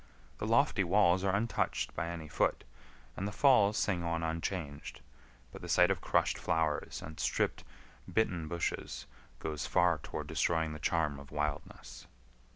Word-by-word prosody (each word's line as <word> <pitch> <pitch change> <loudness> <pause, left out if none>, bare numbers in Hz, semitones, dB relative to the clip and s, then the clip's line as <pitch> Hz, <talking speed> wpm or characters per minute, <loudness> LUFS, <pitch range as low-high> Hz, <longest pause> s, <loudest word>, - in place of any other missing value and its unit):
The - - -2
lofty 95 - +3
walls 95 0 +3
are 100 0 +2
untouched 115 +3 -1
by 85 - -2
any 85 -2 -5
foot, - - 0 0.5
and 100 - -3
the - - -4
falls 110 -3 +4
sing 90 -4 0
on 85 -1 -1
unchanged; 80 -2 -4 0.5
but - - -10
the 90 - -8
sight 90 +2 +5
of 95 - -1
crushed - - +1
flowers 80 -2 -1
and 80 0 -9
stripped, - - 0 0.5
bitten 90 -8 0
bushes 85 +2 -3 0.3
goes 75 -2 -4
far - - +3
toward - - -6
destroying 80 -2 0
the 75 - -7
charm 75 -1 0
of 70 - -12
wildness. 75 -5 -4
85 Hz, 155 wpm, -32 LUFS, 75-95 Hz, 0.5 s, sight